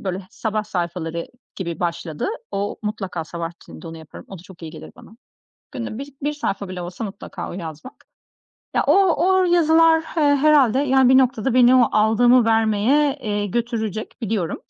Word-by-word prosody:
böyle 190 0 -4
sabah 215 -1 -3
sayfaları 170 -3 -4 0.3
gibi 170 -4 -5
başladı. 170 -3 -3 0.3
O 200 +1 -3
mutlaka 195 -5 -4
sabah 165 +1 -6
içinde - - -13
onu 165 - -8
yaparım, 160 - -12
o 190 - -9
da 165 - -14
çok 180 -2 -16
iyi 160 - -7
gelir 155 -2 -11
bana. 235 -2 -16 0.6
Günde 235 -4 -5
bir 280 0 -8
bir 295 +2 0
sayfa 200 -9 -4
bile 180 -1 -6
olsa 180 +6 -6
mutlaka 200 -1 -7
o - - -7
yazmak 165 - -9 0.7
ya, - - +2
o 360 -4 +3
o 375 0 +4
yazılar, 330 -2 +4 0.2
eee, 320 - +2
herhâlde, 280 -4 +4
yani, 265 -2 +3
bir 260 +1 +6
noktada 250 -1 +1
beni 250 0 +6
o 245 - +5
aldığımı 235 +3 +4
vermeye, 225 +6 +2
eee, 205 -1 -2
götürecek 220 -1 -3
biliyorum. 205 -6 -2
220 Hz, 170 wpm, -21 LUFS, 180-265 Hz, 0.7 s, bir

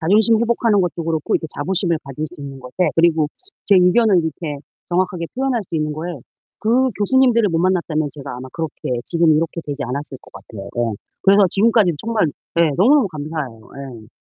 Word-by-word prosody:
자존심 215 +6 +4
회복하는 230 -3 +2
것도 175 -2 -2
그렇고 160 -2 -1
이렇게 160 - 0
자부심을 170 +1 0
가질 140 +3 -5
수 - - -13
있는 135 -1 -8
것에 125 +9 -1
그리고 165 -2 +3 0.4
제 200 - +5
의견을 190 +3 +4
이렇게 160 -2 -4 0.3
정확하게 180 -1 -1
표현할 260 -3 0
수 170 - -9
있는 150 -1 -1
거에 165 +3 -5 0.5
그 255 +4 +2
교수님들을 235 -1 +3
못 165 - -1
만났다면 165 -4 0
제가 140 -4 -7
아마 130 +1 -8
그렇게 145 -6 -4
지금 170 -2 +3
이렇게 165 +2 -1
되지 145 -1 -4
않았을 135 +1 -5
것 - - -17
같아요. 100 +1 -10
네. 120 -3 -1 0.3
그래서 200 0 +6
지금까지 210 -3 +3
정말 225 -6 +1 0.3
예, 165 -2 +4
너무너무 255 +4 +4
감사해요. 150 -7 -5 0.4
예. 110 - -16
170 Hz, 420 characters per minute, -19 LUFS, 150-205 Hz, 0.5 s, 그래서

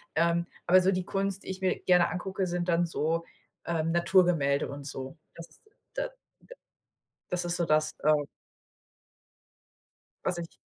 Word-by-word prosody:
Ähm, 170 +1 +2 0.2
aber 185 +1 +7
so 190 +1 +3
die 185 -1 -1
Kunst, 195 0 -2
die - - -9
ich 190 0 -5
mir 185 -1 +1
gerne 180 -1 +5
angucke, 190 +2 -2
sind 175 0 -2
dann 170 0 +3
so, 165 +1 0 0.4
ähm, 165 -1 0
Naturgemälde 170 -5 +3
und 140 0 -7
so. 135 +2 -6 0.2
Das 170 0 -12 0.3
da - - -1
da - - -14 1.2
das 180 0 -1
ist 175 0 -1
so 170 - 0
das, 155 0 +2
äh 155 +1 +5 2.1
was 180 -2 0
ich 170 -1 -7
175 Hz, 150 wpm, -29 LUFS, 165-185 Hz, 2.1 s, aber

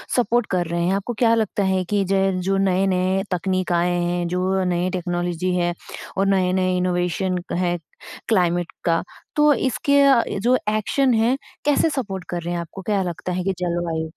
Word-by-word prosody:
Support 240 -1 +2
कर 180 -2 +1
रहे 170 +1 -2
हैं। 185 - +2
आपको 200 +5 -3
क्या 230 -2 +4
लगता 215 -2 0
है 190 -1 +1
कि 205 -1 +2
जे 195 0 +2
जो 195 +2 0
नए-नए 190 0 +1
तकनीक 185 +1 -1
आए 175 +1 +2
हैं, 175 0 -1
जो 185 +2 0
नए 180 0 0
टेक्नोलॉजी 175 0 -2
है 175 -1 +1 0.4
और 195 - +2
नए-नए 185 -1 +2
इनोवेशन 180 +1 0 0.2
है 175 0 0 0.5
क्लाइमेट 175 -5 +1
का, 165 -1 +2 0.3
तो 300 -1 +5
इसके 280 +2 +1
अ, 270 -4 +5 0.2
जो 245 +4 +3
एक्शन 240 +5 +1
है, 230 +4 +2 0.3
कैसे 295 +2 +3
सपोर्ट 200 -11 -4
कर 175 -1 -3
रहे 175 +1 -3
हैं, 175 - -2
आपको 170 +3 -9
क्या 205 0 0
लगता 180 +1 -4
है 180 0 -2
कि 195 - 0
जल 175 -1 -1
वायु 160 -1 -3
185 Hz, 180 wpm, -22 LUFS, 175-200 Hz, 0.5 s, तो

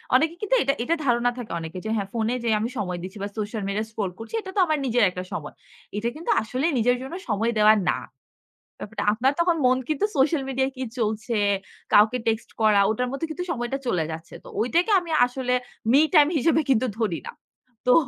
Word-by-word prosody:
অনেকে 320 +5 +3
কিন্তু 425 +4 +2
এটা 275 +1 +2
এটা 330 +7 +1
ধারণা 240 0 +2
থাকে 240 -3 -7
অনেকের 165 +2 -7
যে - - -2
হ্যাঁ, 200 -3 -2
ফোনে 230 0 0
যে 235 - 0
আমি 225 +3 -1
সময় 180 -4 -2
দিচ্ছি 190 +3 -8
বা 205 - -3
সোশ্যাল 210 +1 -3
মিডিয়া 210 +2 -1
স্ক্রল 205 -4 -3
করছি 225 - -9
এটা 380 - -8
তো - - +1
আমার 310 -2 +1
নিজের 240 -2 +2
একটা 180 0 -6
সময়। 150 -3 -5 0.4
এটা 230 +3 0
কিন্তু 325 +3 -2
আসলে 255 +6 -2
নিজের 245 +2 +3
জন্য 265 +4 -7 0.2
সময় 220 +2 +1
দেওয়া 215 0 +7 0.2
না। - - +2 0.8
ব্যাপারটা 220 +2 -5
আপনার 255 +5 +2
তখন 340 0 +3
মন 255 +1 +4
কিন্তু 310 +4 0
সোশ্যাল 280 +2 +3
মিডিয়ায় 265 0 0
কি 260 - -3
চলছে, 220 +1 -1 0.6
কাউকে 215 +4 +6
টেক্সট 225 +1 -1
করা, 215 -2 +5
ওটার 250 +3 -1
মধ্যে 275 +4 -3
কিন্তু 360 +3 -4
সময়টা 240 +1 -3
চলে 180 -9 +1
যাচ্ছে। 160 +1 -9
তো - - -11
ঐটাকে 340 - +2
আমি 340 -2 -9 0.2
আসলে 250 0 -2 0.4
মি 275 - +7
টাইম 295 -1 +7
হিসেবে 315 +4 +3
কিন্তু 255 0 +3
ধরি 205 -8 0
না। - - -6 0.5
তো 250 - +5
240 Hz, 205 wpm, -24 LUFS, 215-270 Hz, 0.8 s, দেওয়া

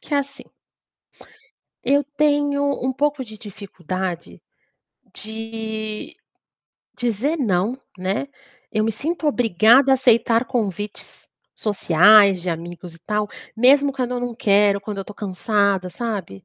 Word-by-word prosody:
que 295 - -5
é - - +3
assim. 280 0 -5 1.4
Eu 280 +3 +3
tenho 290 -1 +2 0.2
um 260 - 0
pouco 285 0 -1
de 215 -2 -12
dificuldade, 185 -4 -6 0.7
de 220 0 -6 0.8
dizer 245 +6 -1
"não", 220 +2 0 0.2
né. 190 +9 -2 0.4
Eu 215 0 0
me 225 - 0
sinto 315 +8 -3
obrigada 240 0 +4
a - - +7
aceitar 235 -2 +3
convites, 210 -5 -5 0.3
sociais, 200 -1 +5
de 180 - -2
amigos 170 +1 -7
e - - -17
tal, 210 +4 -2 0.3
mesmo 275 +4 +5
quando 255 -2 -3
eu 245 - -2
não 245 -1 -4
quero, 205 -4 +3
quando 200 0 -6
eu - - -2
estou 210 - -12
cansada, 200 -1 0
sabe. 190 - -5
220 Hz, 130 wpm, -21 LUFS, 195-255 Hz, 1.4 s, a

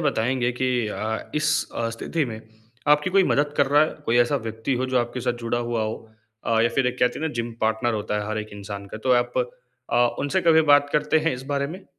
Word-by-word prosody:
बताएँगे 125 -4 +1
कि 130 0 +2 0.2
अ, 110 +1 -4
इस 150 0 +1 0.3
अ, 115 - -1
स्थिति 150 +7 -2
में 110 -4 -6 0.5
आपकी 150 +4 +4
कोई 195 +1 +5
मदद 145 -3 +1
कर 145 - +4
रहा 145 +2 +5
है, 155 - +1 0.2
कोई 115 - +2
ऐसा 120 +4 +3
व्यक्ति 110 +4 -2
हो 130 +1 -1
जो 130 -1 +1
आपके 120 +1 -2
साथ 120 - 0
जुड़ा 115 +1 0
हुआ 115 -2 0
हो? 110 0 -2 0.5
अ, 115 -1 +3
या 120 - +4
फिर 135 - +3
एक 125 0 -2
कहते 125 0 +1
हैं 160 - -1
ना 160 - -4
जिम 120 0 -3
पार्टनर 110 +2 +1
होता 105 0 -2
है 105 - -5
हर 110 0 -2
एक 105 0 -5
इंसान 100 0 -7
का - - -5
तो 125 - +6
आप 120 +1 -5 0.5
अ, - - +3 0.2
उनसे 145 +7 0
कभी 165 -2 +5
बात 145 0 +5
करते 150 +1 +2
हैं 165 +1 0
इस 125 - -8
बारे 140 0 0
में? 185 +6 -9
125 Hz, 245 wpm, -24 LUFS, 110-145 Hz, 0.5 s, तो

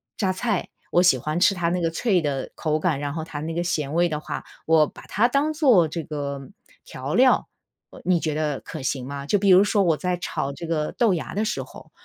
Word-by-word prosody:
榨 190 -3 0
菜 205 0 -2 0.2
我 175 - +4
喜 180 -8 +5
欢 155 +7 -2
吃 195 +2 +4
它 170 -1 0
那 180 +1 -1
个 165 - +1
脆 185 +2 +1
的 140 -3 -3
口 155 -2 -1
感， 155 -3 0
然 145 0 -4
后 160 - -3
它 155 -2 -7
那 160 +2 -4
个 175 - 0
咸 150 -5 -2
味 175 +1 +4
的 155 -3 -3
话， - - -6 0.2
我 160 -2 +5
把 - - -13
它 225 +4 +2
当 285 +5 +1
做 250 - +4
这 160 +1 -5
个 140 -2 -5 0.4
调 135 +3 -5
料， 255 +1 +4 0.6
你 180 -2 +2
觉 155 -1 -2
得 150 -3 -1
可 - - -8
行 130 -1 -2
吗？ 140 0 -6
就 205 +8 +2
比 200 0 +2
如 185 +1 +8
说 205 0 +2
我 165 -4 +2
在 180 -1 -1
炒 140 -5 -3
这 165 +4 -7
个 155 -2 -1
豆 230 -6 +3
芽 165 - -5
的 210 +3 0
时 - - -2
候， - - -14
165 Hz, 255 characters per minute, -24 LUFS, 150-185 Hz, 0.6 s, 如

